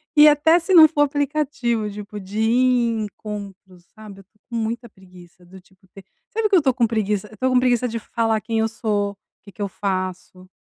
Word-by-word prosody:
E 300 0 +8
até 300 +3 +5
se 355 +3 -2
não 320 -3 +9
for 300 -1 -1
aplicativo, 285 -6 -1
tipo 205 0 -9
de 195 +3 -6
ir 240 +1 +2
em - - -2
encontros, 200 -4 -9
sabe? 215 -3 -12
Eu - - -12
estou 210 +2 -40
com 235 - -6
muita 230 +2 -3
preguiça, 180 -2 -18
do 190 +2 -14
tipo 190 +1 -28
ter 195 - -13 0.3
sabe, 450 0 0
o - - -11
que 395 - +3
eu - - +7
estou 270 -5 +1
com 240 -2 +1
preguiça? 210 -2 -2
Eu - - -18
estou 260 +2 -1
com 255 - +4
preguiça 250 -1 +1
de 230 -1 -4
falar 225 -1 -1
quem 225 -1 -2
eu 220 - +2
sou, 210 -2 -2
o 200 - -18 0.3
que 200 - -14
que 205 - -12
eu 200 - -1
faço, 185 -1 -5
220 Hz, 230 wpm, -21 LUFS, 200-255 Hz, 0.3 s, não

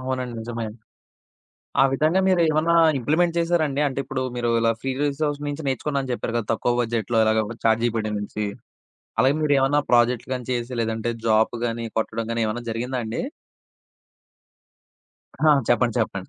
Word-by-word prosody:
అవునండి. 130 -2 -3
నిజమే. 115 0 -4 1.2
ఆ - - +8
విధంగా 155 +7 +2
మీరేమన్నా 170 -2 +3 0.2
ఇంప్లిమెంట్ 170 +6 +1
చేశారాండి? 160 -4 +1
అంటే 135 0 -3
ఇప్పుడు 130 0 -4
మీరు 120 -1 -1
ఇలా 115 0 +3
ఫ్రీ 135 - -2
రిసోర్సెస్ 145 0 -1
నుంచి 145 +1 -4
నేర్చుకున్నానని 135 0 -1
చెప్పారు 120 -1 -3
కదా! 110 - -3
తక్కువ 120 +2 +1
బడ్జెట్‌లో 115 -1 -1
ఇలాగ 110 0 +2 0.2
చాట్ 115 0 +3
జీపీటీ 110 -2 0
నుంచి. 105 +1 -4 0.7
అలాగే 135 +4 +4
మీరేమన్నా 145 -1 +3
ప్రాజెక్ట్‌లు 120 +1 +3
గానీ 125 -2 -4
చేసి, 120 0 -2
లేదంటే 115 +1 -2 0.2
జాబ్ 110 +1 +3
గానీ 115 0 -3
కొట్టడం 115 +1 -2
ఏమన్నా 120 +3 -3
జరిగిందా 125 +3 -3
అండి? 110 - -3 2.2
ఆ! - - 0 0.2
చెప్పండి. 120 -1 +2
చెప్పండి. 100 -4 -3
125 Hz, 140 wpm, -23 LUFS, 115-145 Hz, 2.2 s, ఆ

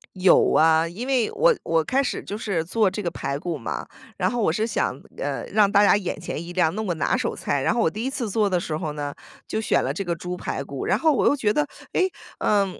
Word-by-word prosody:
有 185 0 +5
啊。 160 +1 +4
因 210 +10 -6
为 255 -5 +2
我 - - +4
我 165 -1 +1
开 260 - +1
始 275 - -3
就 205 - -5
是 195 -7 -1
做 205 +4 +2
这 210 - -4
个 175 - 0
排 140 0 -3
骨 165 +1 -3
嘛， 70 - -5 0.3
然 - - +1
后 240 -1 -1
我 200 - +3
是 215 +6 0
想， 230 - -1 0.2
呃， - - -3
让 205 -2 +4
大 205 0 +5
家 205 - +6
眼 200 -3 -2
前 - - -5
一 170 - -8
亮， 170 -2 +2
那 215 - -2
我 195 -5 -1
拿 160 - +1
手 - - -1
菜。 140 -1 -1
然 - - +2
后 235 - +1
我 165 - +3
第 215 +7 -5
一 260 - 0
次 255 -5 -3
做 205 0 +1
的 180 - +1
时 160 -2 -3
候 155 -1 -3
呢， 145 -1 -4 0.3
就 - - -2
选 - - +2
了 - - -1
这 200 - -3
个 175 -2 -2
猪 180 +2 -5
排 - - -3
骨， - - -6
然 - - +2
后 320 -2 +3
我 - - +1
又 285 - +4
觉 215 -6 +1
得， 295 +3 +1 0.3
诶， 375 0 +2 0.3
嗯， 200 -3 +1
195 Hz, 285 characters per minute, -24 LUFS, 165-220 Hz, 0.3 s, 家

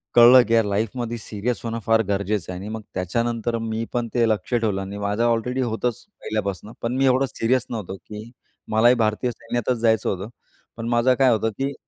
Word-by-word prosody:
कळलं, 120 +2 +9
की 115 - 0
यार 115 -2 +4
लाईफमध्ये 115 +3 -2
सीरियस 110 +2 -3
होणं 115 0 -3
फार 115 0 +4
गरजेचं 100 -2 -1
आहे 90 - -6
आणि 105 - -6
मग 110 0 -5
त्याच्यानंतर 115 +5 -1
मी 110 0 -2
पण 120 -1 -1
ते 120 -2 +3
लक्ष 110 +2 -2
ठेवलं 105 -4 0
आणि 100 +1 -6
माझं 105 +3 -1
ऑलरेडी 120 +3 0
होतंच 120 0 -2 0.2
पहिल्यापासून 105 -1 -3
पण 115 +2 -2
मी 135 - +3
एवढं 130 +1 +3
सीरियस 125 +2 +1
नव्हतो, 100 -5 -5
की 110 +4 -10 0.4
मलाही 120 +3 +5
भारतीय 115 +2 0
सैन्यातच 120 +1 -2
जायचं 110 -2 +2
होतं, 95 +3 -4 0.5
पण 115 0 -4
माझं 120 +2 +3
काय 130 -1 +5
होतं, 110 0 +1
की 140 +1 -1
115 Hz, 190 wpm, -23 LUFS, 105-120 Hz, 0.5 s, कळलं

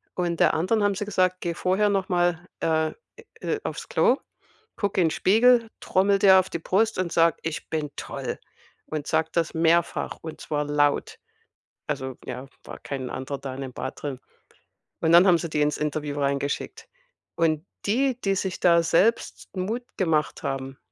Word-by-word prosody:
Und 175 -2 -1
der - - +4
anderen 205 +6 +1
haben 205 -1 +2
sie 205 - -3
gesagt: 185 -2 +1
„Geh 170 -1 -2
vorher 190 +4 +2
noch 195 -2 0
mal, 175 -1 +1
äh, 160 -1 +1 0.5
äh, 435 - -1
auf's - - -5
Klo, - - +3 0.6
guck 205 -3 -2
in 170 -4 +4
Spiegel, 230 +5 +4
trommel 195 +1 +2
dir 190 -1 +7
auf 185 - -1
die 170 - -4
Brust 215 +6 +1
und 180 -2 -1
sag: 165 -1 +4
,Ich 165 -1 -4
bin 150 -2 -2
toll!'" - - -5 0.5
Und 150 -2 -4
sag 160 0 0
das 170 -2 0
mehrfach, 165 +1 +1
und 160 -1 -8
zwar 150 -1 -2
laut.“ 145 0 +1 0.7
Also, 130 -1 -4
ja, 130 +2 -6 0.2
war - - -9
kein 130 -3 -5
anderer 135 +2 -4
da 135 -1 -6
in 135 - -7
dem 130 - -6
Bad 130 - -6
drin. 140 -3 -4 0.8
Und 160 - +2
dann 175 +2 +8
haben 175 -2 +6
sie 170 - -4
die 150 -1 0
ins 150 0 +1
Interview 150 -1 -3
reingeschickt. 140 0 -2 0.5
Und 160 0 +1 0.2
die, 250 +4 +1
die 195 -1 +1
sich 190 0 -3
da 170 -1 +5
selbst 195 +8 +1
Mut 215 +7 -2
gemacht 160 -6 0
haben, 135 0 -4
170 Hz, 175 wpm, -25 LUFS, 150-190 Hz, 0.8 s, dann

